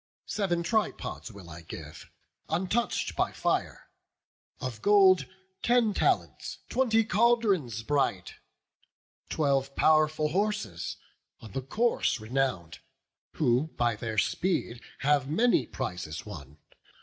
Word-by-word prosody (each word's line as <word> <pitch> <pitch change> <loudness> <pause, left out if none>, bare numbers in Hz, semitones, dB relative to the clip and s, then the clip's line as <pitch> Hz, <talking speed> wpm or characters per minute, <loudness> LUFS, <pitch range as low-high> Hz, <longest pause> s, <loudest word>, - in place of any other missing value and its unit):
Sev'n 185 -5 -1
tripods 205 - -2
will 100 -4 -12
I 85 0 -9
give, 80 - -10 0.4
untouch'd 190 +8 -1
by - - +1
fire; - - -2 0.7
Of 130 -6 -5
gold, 190 -7 +5 0.3
ten 240 -3 +3
talents, - - 0
twenty 225 -4 +3
caldrons 205 - +2
bright, 135 -9 0 1.0
Twelve 140 -2 0
pow'rful 155 0 +3
horses, 175 - -1 0.4
on 110 - -11
the 135 - -3
course 220 - 0
renown'd, 110 -7 -2 0.5
Who 130 +1 +2
by 120 -2 +2
their 110 0 -5
speed 120 - 0 0.2
have 140 -1 +2
many 230 +10 +3
prizes 90 -10 -5
won. 75 -8 -10
145 Hz, 105 wpm, -29 LUFS, -, 1.0 s, gold